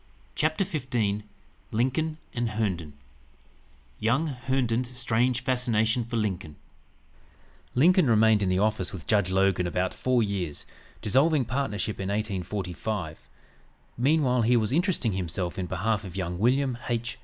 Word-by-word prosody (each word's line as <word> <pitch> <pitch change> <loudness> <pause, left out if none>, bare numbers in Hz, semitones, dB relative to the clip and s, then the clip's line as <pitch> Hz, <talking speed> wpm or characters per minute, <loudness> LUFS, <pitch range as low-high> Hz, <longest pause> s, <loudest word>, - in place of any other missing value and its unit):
CHAPTER 155 +5 +1
XV 125 - -1 0.5
LINCOLN 135 +7 0
& - - -35
HERNDON 105 -9 -2 1.1
YOUNG 125 +9 +2 0.2
HERNDON'S 125 -2 +1
STRANGE 120 +1 +1
FASCINATION 120 -2 +1
FOR 115 0 -3
LINCOLN 95 -8 -2 1.2
Lincoln 175 +4 +5
remained 110 -1 +5
in 95 - +1
the 90 - +2
office 105 -2 +1
with 90 -5 -7
Judge 100 -4 +2
Logan 95 -1 +2
about 90 +1 -1
four 125 -2 +1
years, 95 -7 -3 0.4
dissolving 135 +5 +3
partnership 110 -4 -2
in 95 0 -3
1845. 95 - -3 0.7
Meanwhile 130 -1 +2
he 120 +2 +4
was 110 +1 0
interesting 170 - +1
himself 90 0 -3
in 90 - -2
behalf 110 +2 -1
of 95 -3 -9
young 90 -2 -3
William 125 +2 +2
H. 120 0 -2
110 Hz, 130 wpm, -27 LUFS, 95-125 Hz, 1.2 s, Lincoln